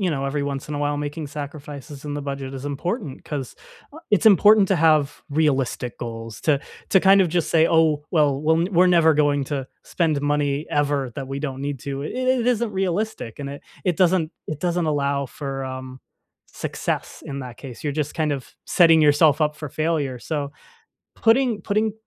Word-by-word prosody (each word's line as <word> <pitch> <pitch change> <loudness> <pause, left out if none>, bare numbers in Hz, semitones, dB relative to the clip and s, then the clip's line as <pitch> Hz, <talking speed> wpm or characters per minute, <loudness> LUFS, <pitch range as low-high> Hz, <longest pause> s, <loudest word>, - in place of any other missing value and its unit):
you 185 -3 +1
know, 135 -2 -2
every 140 +1 -1
once 140 0 -4
in 150 - -4
a - - -3
while 145 0 0
making 145 +1 -4
sacrifices 145 -1 -8
in 145 0 -4
the 145 - -4
budget 140 -1 -5
is 135 +1 -7
important 150 - -4
'cause 140 -4 -5 0.6
it's 210 +2 +3
important 205 0 +7
to 195 - +3
have 155 -3 +2
realistic 135 -5 0
goals 115 -1 -7
to 145 -3 +2 0.3
to 190 - +5
kind 195 +1 +6
of 180 - +3
just 170 -1 -1
say, 160 -1 +5
"Oh, 155 -3 +3
well, 145 -4 +3
we're 160 +4 +2
we're 180 0 +5
never 170 -3 +5
going 145 -1 +2
to 135 -1 -4 0.2
spend 155 -5 0
money, 145 0 0
ever, 145 -3 0
that 135 -1 -4
we 135 +1 -4
don't 135 -3 -4
need 140 -2 -4
to." 140 +1 -4
I - - -2
it 255 -1 0
isn't 235 -2 +1
realistic 190 - -2
and 140 - -5
it 140 - -9 0.2
it 180 -3 +1
doesn't 180 -3 +2 0.2
it 155 -1 -5
doesn't 175 -1 0
allow 140 -2 0
for, 135 0 -5
um, 130 0 -7 0.5
success - - -4
in 140 0 -5
that 125 -2 -8
case. 130 -4 -10
You're 145 - -1
just 150 0 -2
kind 155 -2 0
of 135 -2 -6
setting 165 -3 +5
yourself 150 +1 +4
up 150 0 +1
for 150 -1 -6
failure, 150 -4 -1
so 145 -3 -3 0.6
putting 230 -1 +2
putting 215 +1 0
150 Hz, 195 wpm, -23 LUFS, 140-170 Hz, 0.6 s, important